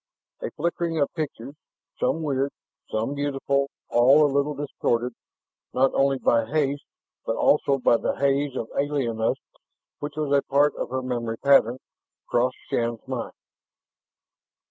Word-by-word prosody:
A -, -, -3 dB
flickering 170 Hz, 0 st, -1 dB
of 140 Hz, -, +1 dB
pictures, 140 Hz, -4 st, -5 dB, 0.5 s
some 165 Hz, -, 0 dB
weird, 140 Hz, -2 st, 0 dB, 0.4 s
some 110 Hz, +5 st, -1 dB
beautiful, 140 Hz, -1 st, 0 dB, 0.2 s
all 135 Hz, +6 st, +6 dB
a 140 Hz, -, 0 dB
little 140 Hz, +1 st, +1 dB
distorted 125 Hz, -4 st, -1 dB, 0.6 s
not 135 Hz, +1 st, +3 dB
only 135 Hz, 0 st, +2 dB
by 115 Hz, -2 st, +3 dB
haste, 145 Hz, +3 st, -1 dB, 0.4 s
but -, -, -1 dB
also 140 Hz, -1 st, +3 dB
by 120 Hz, -2 st, +4 dB
the -, -, -1 dB
haze 140 Hz, 0 st, +1 dB
of 115 Hz, -, -3 dB
alienness 130 Hz, -6 st, 0 dB, 0.6 s
which 145 Hz, 0 st, -5 dB
was 145 Hz, -2 st, +1 dB
a 140 Hz, -, +4 dB
part 145 Hz, +2 st, +2 dB
of -, -, -4 dB
her 130 Hz, +1 st, -2 dB
memory 120 Hz, -3 st, -3 dB
pattern 130 Hz, -3 st, +4 dB, 0.5 s
crossed 125 Hz, +1 st, +1 dB
Shann's 115 Hz, +1 st, -1 dB
mind. 130 Hz, -3 st, -4 dB
140 Hz, 140 wpm, -25 LUFS, 125-145 Hz, 0.6 s, all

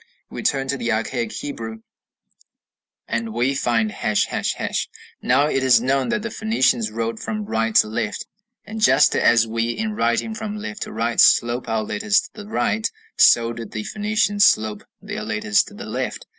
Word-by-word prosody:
We -, -, -6 dB
turn 135 Hz, -2 st, 0 dB
to 140 Hz, -, 0 dB
the 115 Hz, -2 st, -2 dB
archaic 115 Hz, +1 st, -2 dB
Hebrew, 115 Hz, -6 st, -6 dB, 1.3 s
and 115 Hz, -1 st, -3 dB
we 125 Hz, +3 st, +1 dB
find 115 Hz, -5 st, 0 dB
###. 105 Hz, 0 st, -2 dB
Now 130 Hz, +4 st, +3 dB
it 135 Hz, -3 st, 0 dB
is 125 Hz, -3 st, +5 dB
known 130 Hz, +1 st, 0 dB
that 210 Hz, -, -1 dB
the 230 Hz, -, -4 dB
Phoenicians 130 Hz, -, +1 dB
wrote 115 Hz, +1 st, -3 dB
from 215 Hz, -1 st, -4 dB
right 115 Hz, -, -1 dB
to -, -, +6 dB
left, 110 Hz, -1 st, -3 dB, 0.4 s
and 220 Hz, +1 st, -7 dB
just -, -, +5 dB
as 115 Hz, -1 st, +4 dB
we 115 Hz, +1 st, -2 dB
in 215 Hz, -, -2 dB
writing 120 Hz, -, 0 dB
from 215 Hz, -1 st, -5 dB
left 105 Hz, -, -7 dB
to -, -, -4 dB
right 115 Hz, +1 st, -2 dB
slope 120 Hz, +1 st, +4 dB
our 110 Hz, -1 st, 0 dB
letters 205 Hz, -, +1 dB
to -, -, -12 dB
the 210 Hz, -1 st, -10 dB
right, 220 Hz, 0 st, 0 dB, 0.3 s
so 115 Hz, 0 st, +5 dB
did 115 Hz, -2 st, -8 dB
the 110 Hz, -, -4 dB
Phoenicians 210 Hz, -, 0 dB
slope 110 Hz, -, +2 dB, 0.2 s
their -, -, -5 dB
letters 105 Hz, -1 st, +1 dB
to -, -, -13 dB
the -, -, -8 dB
left. -, -, -4 dB
120 Hz, 175 wpm, -21 LUFS, -, 1.3 s, to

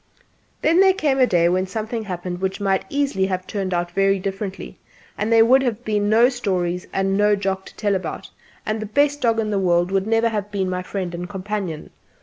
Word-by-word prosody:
Then 330 Hz, +3 st, +4 dB
there 380 Hz, -1 st, +5 dB
came 290 Hz, -8 st, +1 dB
a 255 Hz, -, +5 dB
day 170 Hz, -4 st, +3 dB
when 185 Hz, +2 st, +1 dB
something 220 Hz, +3 st, -4 dB
happened 180 Hz, -1 st, -5 dB
which 190 Hz, +1 st, -2 dB
might 195 Hz, -1 st, 0 dB
easily 275 Hz, -10 st, 0 dB
have 185 Hz, -1 st, -3 dB
turned 195 Hz, -2 st, -3 dB
out 175 Hz, 0 st, -1 dB
very 195 Hz, +1 st, +2 dB
differently, 195 Hz, 0 st, -5 dB, 0.4 s
and 210 Hz, +2 st, -2 dB
there 225 Hz, 0 st, +6 dB
would 260 Hz, +3 st, +5 dB
have 240 Hz, -2 st, -2 dB
been 210 Hz, -1 st, 0 dB
no 230 Hz, +3 st, +6 dB
stories 185 Hz, -8 st, -2 dB
and 195 Hz, 0 st, 0 dB
no 210 Hz, +1 st, +3 dB
Jock 195 Hz, -1 st, -2 dB
to -, -, -14 dB
tell 205 Hz, -2 st, 0 dB
about; 190 Hz, -1 st, -4 dB, 0.3 s
and 215 Hz, 0 st, -2 dB
the 215 Hz, -, -5 dB
best 290 Hz, +5 st, +1 dB
dog 230 Hz, -2 st, +2 dB
in 215 Hz, -1 st, -1 dB
the 200 Hz, -, +1 dB
world 175 Hz, -1 st, +2 dB
would 195 Hz, +1 st, 0 dB
never 225 Hz, +1 st, +2 dB
have 210 Hz, -2 st, -3 dB
been 190 Hz, -2 st, -2 dB
my 180 Hz, 0 st, -2 dB
friend 185 Hz, -1 st, -4 dB
and 175 Hz, +1 st, -5 dB
companion. 195 Hz, -4 st, -5 dB
200 Hz, 215 wpm, -21 LUFS, 185-225 Hz, 0.4 s, there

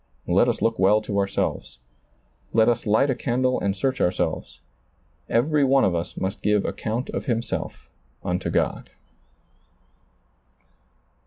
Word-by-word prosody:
Let -, -, +3 dB
us -, -, -1 dB
look 115 Hz, 0 st, +1 dB
well 100 Hz, +3 st, +5 dB
to 100 Hz, -1 st, -1 dB
ourselves. 100 Hz, -10 st, -2 dB, 0.8 s
Let 110 Hz, 0 st, +4 dB
us 120 Hz, -1 st, +1 dB
light 110 Hz, +7 st, +3 dB
a -, -, -1 dB
candle 130 Hz, +1 st, 0 dB
and 100 Hz, -1 st, -1 dB
search 130 Hz, +4 st, -1 dB
ourselves. 90 Hz, -, -1 dB, 0.7 s
Every 145 Hz, +5 st, +2 dB
one 135 Hz, 0 st, +4 dB
of 95 Hz, -, +1 dB
us 85 Hz, 0 st, -4 dB
must 95 Hz, +2 st, -3 dB
give 105 Hz, -1 st, +2 dB
account 115 Hz, +4 st, -3 dB
of -, -, -4 dB
himself 115 Hz, -4 st, -3 dB, 0.4 s
unto -, -, -2 dB
God. -, -, -1 dB
115 Hz, 135 wpm, -24 LUFS, 100-130 Hz, 0.8 s, well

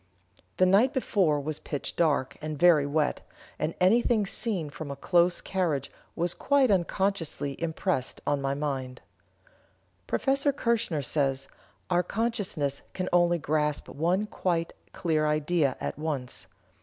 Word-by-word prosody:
The 185 Hz, -, +5 dB
night 210 Hz, +9 st, +4 dB
before 190 Hz, -, +1 dB
was 150 Hz, +1 st, -4 dB
pitch 145 Hz, -, -4 dB
dark, 150 Hz, -6 st, +1 dB
and 155 Hz, -1 st, -4 dB
very 155 Hz, -3 st, +5 dB
wet, 150 Hz, +1 st, 0 dB, 0.4 s
and 160 Hz, -, -2 dB
anything 215 Hz, +3 st, +3 dB
seen 190 Hz, -7 st, +1 dB
from 150 Hz, 0 st, -7 dB
a 140 Hz, -, -4 dB
close 175 Hz, +4 st, +2 dB
carriage 165 Hz, -8 st, -1 dB, 0.2 s
was 175 Hz, +1 st, -1 dB
quite 275 Hz, -4 st, +2 dB
unconsciously 180 Hz, -6 st, 0 dB
impressed 165 Hz, -4 st, -1 dB
on 145 Hz, -1 st, 0 dB
my 135 Hz, 0 st, -1 dB
mind." 135 Hz, -3 st, -4 dB, 1.1 s
Prof. -, -, -2 dB, 0.3 s
Kirchener 230 Hz, -, 0 dB
says: 135 Hz, -2 st, 0 dB, 0.4 s
"Our 175 Hz, 0 st, +4 dB
consciousness 190 Hz, -, -2 dB
can 185 Hz, -1 st, -2 dB
only 175 Hz, -1 st, +4 dB
grasp 150 Hz, -1 st, -1 dB
one 175 Hz, +7 st, 0 dB
quite 170 Hz, -5 st, -2 dB, 0.2 s
clear 155 Hz, -3 st, 0 dB
idea 150 Hz, -1 st, +1 dB
at -, -, -4 dB
once. 145 Hz, -5 st, -3 dB
165 Hz, 130 wpm, -28 LUFS, 145-185 Hz, 1.1 s, The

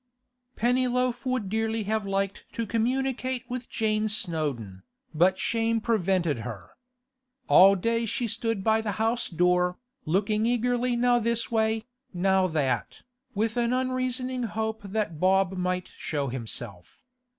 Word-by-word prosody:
Pennyloaf 250 Hz, +1 st, +1 dB
would 255 Hz, -5 st, 0 dB
dearly 220 Hz, +2 st, -1 dB
have 215 Hz, 0 st, -1 dB
liked 195 Hz, 0 st, -2 dB
to 230 Hz, -, -2 dB
communicate 255 Hz, +2 st, -1 dB
with 250 Hz, -1 st, -5 dB
Jane 215 Hz, -1 st, 0 dB
Snowdon, 145 Hz, -, -2 dB, 0.3 s
but 180 Hz, +4 st, +3 dB
shame 230 Hz, 0 st, 0 dB
prevented 185 Hz, -, +1 dB
her. 110 Hz, -7 st, -7 dB, 0.8 s
All 195 Hz, +2 st, +7 dB
day 230 Hz, +4 st, 0 dB
she 240 Hz, -, -1 dB
stood 225 Hz, -2 st, -2 dB
by 220 Hz, +1 st, +3 dB
the 210 Hz, -2 st, -2 dB
house 225 Hz, +4 st, 0 dB
door, 180 Hz, +1 st, +2 dB, 0.3 s
looking 210 Hz, +6 st, +1 dB
eagerly 245 Hz, +1 st, +1 dB
now 245 Hz, 0 st, +3 dB
this 235 Hz, 0 st, -1 dB
way, 220 Hz, 0 st, +1 dB, 0.3 s
now 190 Hz, +1 st, +3 dB
that, 140 Hz, -8 st, -1 dB, 0.3 s
with 220 Hz, +3 st, 0 dB
an 240 Hz, 0 st, +1 dB
unreasoning 255 Hz, 0 st, -1 dB
hope 220 Hz, -1 st, -2 dB
that 200 Hz, -5 st, -3 dB
Bob 190 Hz, +1 st, +3 dB
might 180 Hz, 0 st, -1 dB
show 145 Hz, -3 st, -3 dB
himself. 115 Hz, -7 st, -7 dB
220 Hz, 130 wpm, -27 LUFS, 185-235 Hz, 0.8 s, All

